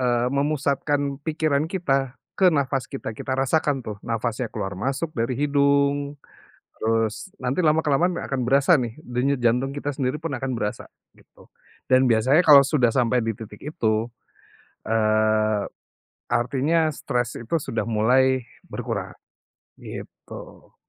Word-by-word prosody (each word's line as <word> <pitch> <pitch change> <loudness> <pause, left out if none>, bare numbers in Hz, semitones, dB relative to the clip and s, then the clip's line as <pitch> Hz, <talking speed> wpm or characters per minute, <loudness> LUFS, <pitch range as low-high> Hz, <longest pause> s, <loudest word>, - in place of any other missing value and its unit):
eee, 120 -1 +1
memusatkan 140 0 0
pikiran 155 -1 0
kita, 135 -8 -1 0.2
ke 190 -2 +6
nafas 135 -2 0
kita, 135 -5 -6
kita 130 - -3
rasakan 135 0 +1
tuh 105 -3 -7
nafasnya 115 +1 -2
keluar 95 -3 -5
masuk 140 +8 -2
dari 115 -1 -2
hidung, 140 0 +1 0.6
terus, 115 - 0 0.2
nanti 125 +5 -1
lama-kelamaan 160 +2 +2
akan 135 -2 -3
berasa 140 +4 +4
nih, 120 -3 -3
denyut 125 +1 -1
jantung 125 +4 +1
kita 145 0 -3
sendiri 130 0 -2
pun 165 - -3
akan 130 0 -3
berasa, 105 -3 -3 0.3
gitu. - - -22 0.4
Dan 130 0 +5
biasanya 125 +8 +4
kalau 140 -2 +9
sudah 135 -3 +2
sampai 125 -1 +2
di 115 -1 -2
titik 105 -1 -11
itu. 115 -7 -1 0.8
Eee, 110 -1 +2 0.7
artinya 145 +7 +1
stres 120 0 -2
itu 120 +7 -3
sudah 115 -4 -2
mulai 125 +4 +3 0.2
berkurang, - - -4 0.7
gitu. - - -11
130 Hz, 130 wpm, -24 LUFS, 115-145 Hz, 0.8 s, kalau